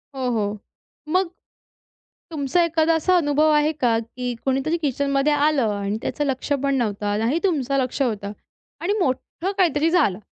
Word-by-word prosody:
हो, 260 -2 -1
हो. 210 -2 -1 0.5
मग 370 +2 +2 1.0
तुमचा 310 +2 +1
एखादा 330 0 +2
असा 365 +3 +2
अनुभव 305 -1 +3
आहे 300 +1 +3
का 245 -6 +1
की 245 +2 -5
कोणीतरी 270 +5 0
किचनमध्ये 280 +1 +1
आलं 285 -7 +2
आणि 200 +1 -2
त्याचं 295 - -2
लक्ष 270 +1 -2
पण 275 -1 +1
नव्हतं, 205 -3 -1
नाही 235 +8 +1
तुमचं 275 -7 +1
लक्ष 260 +1 -1
होतं 210 -5 -2 0.5
आणि 365 +4 0
मोठं 335 +5 -2
काहीतरी 325 -3 +3
झालं? 300 - +2
275 Hz, 150 wpm, -22 LUFS, 240-315 Hz, 1.0 s, अनुभव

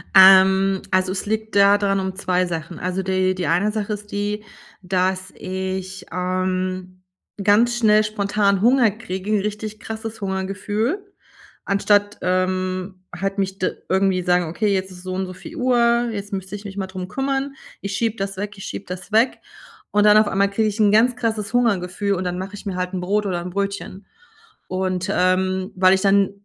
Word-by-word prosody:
Ähm, 190 0 +7
also 185 0 +2
es 190 - -3
liegt 220 0 -3
da 200 0 +6
dran 195 -1 +1
um 190 0 -3
2 185 -2 0
Sachen. 165 0 -5
Also, 185 +1 -2
die 185 0 +1
die 180 -5 -2
1 180 +6 +2
Sache 210 -1 -2
ist 210 0 -8
die, 205 +1 -2 0.4
dass 185 0 -1
ich, 190 0 -5
ähm, 185 +1 -2 0.4
ganz 225 +4 +4
schnell 215 -2 +5
spontan 200 -2 +1
Hunger 240 -1 +4
kriege, 200 -1 -2
richtig 210 +1 -4
krasses 225 -1 -6
Hungergefühl. 205 - -2 0.6
Anstatt, 205 +1 +2
ähm, 185 0 -1
halt 195 +3 -3
mich 195 0 -2
da 185 - +1 0.2
irgendwie 190 -1 +2
sagen: 180 0 +2
„Okay, 200 +5 0
jetzt 190 0 -2
ist 180 - -11
es - - -14
so 185 0 -4
und 190 +1 -2
so 185 - -8
viel 320 - -11
Uhr, 240 -2 +3
jetzt 205 -1 -6
müsste 190 +1 -5
ich 205 - -9
mich 200 0 -8
mal 190 -1 -2
drum 185 -1 -7
kümmern.“ 270 +2 -2 0.3
Ich 200 0 -4
schiebe 230 -1 0
das 195 -1 -4
weg, 205 +1 -4
ich 195 - -9
schiebe 200 - -6
das 180 +3 -7
weg. 225 +4 +3 0.5
Und 210 0 +3
dann 210 0 +7
auf 215 -1 +5
einmal 195 +1 +2
kriege 215 +2 +1
ich 210 +2 -6
'n 205 -1 +5
ganz 240 +3 +4
krasses 220 -3 -2
Hungergefühl 200 -4 +1
und 185 - -3
dann 180 0 -2
mache 190 +2 -6
ich 205 - -11
mir 195 - -3
halt 180 +1 -3
'n 180 - -2
Brot 205 +3 0
oder 180 -3 -1
'n 180 - -6
Brötchen. 200 0 -4 0.6
Und, 185 0 -2
ähm, 185 +2 +1
weil 185 0 +5
ich 190 - 0
dann 195 -1 +4
195 Hz, 190 wpm, -21 LUFS, 185-210 Hz, 0.6 s, Ähm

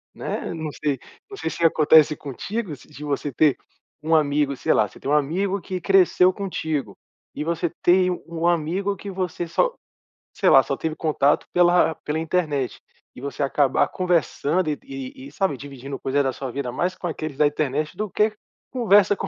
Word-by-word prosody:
né? - - -4
Não 160 -2 -4
sei 145 -1 -2 0.3
não 400 - -9
sei - - -2
se 170 - -4
acontece 155 -1 +5
contigo, 165 - -5
se 130 - -18
de 150 -1 -11
você 145 0 -2
ter 145 +2 +3 0.4
um 160 +1 +2
amigo 145 -2 +2
sei - - +1
lá. 105 - +3
Você - - -16
tem - - -5
um - - +3
amigo 180 +7 +1
que 185 +1 -4
cresceu 185 -1 +4
contigo 160 -7 -3 0.4
e - - -3
você 170 +1 -1
tem 180 +1 +4 0.2
um 170 0 -1
amigo 175 +4 0
que 200 +1 -8
você 180 -2 -3
só, - - +1 0.6
sei - - +2
lá, - - +8
só - - -3
teve 160 -1 -3
contato 150 -3 +1
pela 175 -2 +4
pela 150 +1 -2
internet, 155 -6 -1 0.4
e - - -10
você 140 +1 -5
acabar 140 -1 +2
conversando 175 -1 0
e 150 - 0
de - - -25
e 270 0 -8
e - - -13
sabe, 190 -7 0
dividindo 135 0 -8
coisa 140 +2 +1
da 135 -2 0
sua 130 +1 -5
vida 135 -1 -3
mais 180 +9 -1
com 180 - -5
aqueles 155 -3 -5
da 150 0 +5
internet 150 +1 -2
do 215 0 -3
que 215 0 +2 0.4
conversa 205 -5 +4
com 195 - -4
160 Hz, 195 wpm, -23 LUFS, 145-185 Hz, 0.6 s, lá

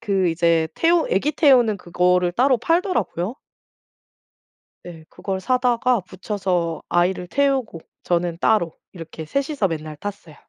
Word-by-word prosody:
그 195 -5 +1
이제 165 -1 +2
태우 335 0 +2
애기 275 +12 +1
태우는 250 -8 +4
그거를 180 0 +1
따로 255 +6 +3
팔더라고요. 255 - -1 1.5
예. 165 -3 -10
그걸 190 +1 -5
사다가 250 0 +1
붙여서 185 -3 -3
아이를 180 +1 +1
태우고 265 -10 0 0.2
저는 175 -1 -1
따로 175 -7 +1 0.2
이렇게 165 -2 -9
3 275 - -2
이서 275 -10 0
맨날 155 -2 -5
탔어요. 190 -3 -8
190 Hz, 280 characters per minute, -21 LUFS, 170-250 Hz, 1.5 s, 태우는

